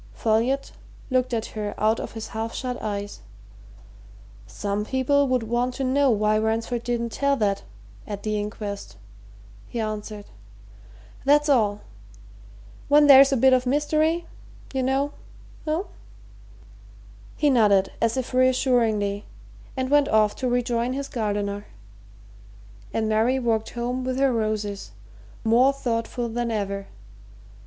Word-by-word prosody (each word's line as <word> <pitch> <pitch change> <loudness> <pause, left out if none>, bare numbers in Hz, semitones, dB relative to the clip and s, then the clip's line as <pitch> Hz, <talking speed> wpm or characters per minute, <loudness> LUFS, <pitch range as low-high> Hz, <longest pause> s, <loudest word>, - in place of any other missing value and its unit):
Folliot 230 - 0 0.4
looked 255 0 +1
at 225 -2 -1
her 210 -1 -4
out 220 +1 +2
of - - -6
his 225 -1 -6
half 225 +1 -4
shut 250 -1 -4
eyes. 205 -1 -4 1.3
"Some 200 - -3
people 265 +4 +1
would 255 -2 +1
want 240 +2 -1
to 270 - -3
know 270 +2 +3
why 215 -1 +2
Ransford 225 +2 -1
didn't 235 -1 -2
tell 280 +3 +1
that 205 -5 0 0.5
at 200 -1 -6
the 215 -1 -1
inquest," 205 - -6 0.7
he 235 - -5
answered. 215 -1 -4 1.0
"That's 295 +2 +4
all. 210 -6 +2 1.1
When 295 +1 +6
there's 275 0 +8
a 270 - +2
bit 260 +2 +5
of 255 0 +2
mystery, 310 +4 +1 0.5
you 265 - 0
know 270 +2 0 0.6
eh?" 315 +4 0 1.5
He 295 -2 +3
nodded 205 -6 +4
as 230 +2 +1
if 255 0 -3
reassuringly 240 -6 +2 0.5
and 260 +1 -2
went 290 -1 +4
off 215 -1 +3
to 255 - -1
rejoin 245 0 0
his 275 +1 -4
gardener, 205 -2 -2 1.2
and 220 -1 -1
Mary 220 +4 +2
walked 225 -3 0
home 245 +2 -3
with 255 0 -2
her 270 -1 +3
roses, 215 - -2 0.5
more 240 +4 +4
thoughtful 240 -2 -2
than 235 +1 -2
ever. 200 -2 -3
235 Hz, 130 wpm, -24 LUFS, 215-260 Hz, 1.5 s, there's